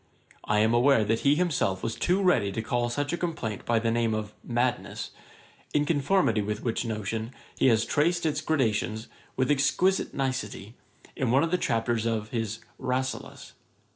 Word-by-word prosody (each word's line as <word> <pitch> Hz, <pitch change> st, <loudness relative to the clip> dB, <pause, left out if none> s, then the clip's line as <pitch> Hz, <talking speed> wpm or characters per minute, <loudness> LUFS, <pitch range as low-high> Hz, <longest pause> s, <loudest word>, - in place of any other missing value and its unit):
I 105 Hz, -, +1 dB
am 110 Hz, +1 st, +3 dB
aware 120 Hz, -1 st, +4 dB
that 115 Hz, +2 st, +1 dB
he 140 Hz, +1 st, +3 dB
himself 145 Hz, -, 0 dB
was 115 Hz, -, -1 dB
too 185 Hz, +3 st, +1 dB
ready 115 Hz, -, +3 dB
to 110 Hz, -, -3 dB
call 120 Hz, +1 st, 0 dB
such 145 Hz, +5 st, -2 dB
a -, -, 0 dB
complaint 140 Hz, -, -4 dB
by 115 Hz, -, +2 dB
the 115 Hz, 0 st, +1 dB
name 115 Hz, -1 st, +1 dB
of 105 Hz, -1 st, -4 dB
madness; 125 Hz, +1 st, -2 dB, 0.6 s
in 150 Hz, 0 st, +3 dB
conformity 145 Hz, -, +2 dB
with 105 Hz, +1 st, -3 dB
which 115 Hz, -1 st, -1 dB
notion, 110 Hz, +1 st, -4 dB, 0.2 s
he -, -, +3 dB
has 115 Hz, -2 st, +4 dB
traced 170 Hz, +3 st, +1 dB
its 150 Hz, -1 st, 0 dB
gradations, 110 Hz, -7 st, 0 dB, 0.3 s
with 130 Hz, +1 st, +2 dB
exquisite 180 Hz, +7 st, +2 dB
nicety, 125 Hz, -6 st, -3 dB, 0.4 s
in 130 Hz, -, -1 dB
one 135 Hz, +4 st, +4 dB
of 165 Hz, -, -1 dB
the 180 Hz, -, +3 dB
chapters 115 Hz, -3 st, 0 dB
of 110 Hz, -2 st, -2 dB
his 115 Hz, -2 st, -3 dB, 0.2 s
RASSELAS. 130 Hz, +1 st, -3 dB
120 Hz, 170 wpm, -27 LUFS, 110-145 Hz, 0.6 s, aware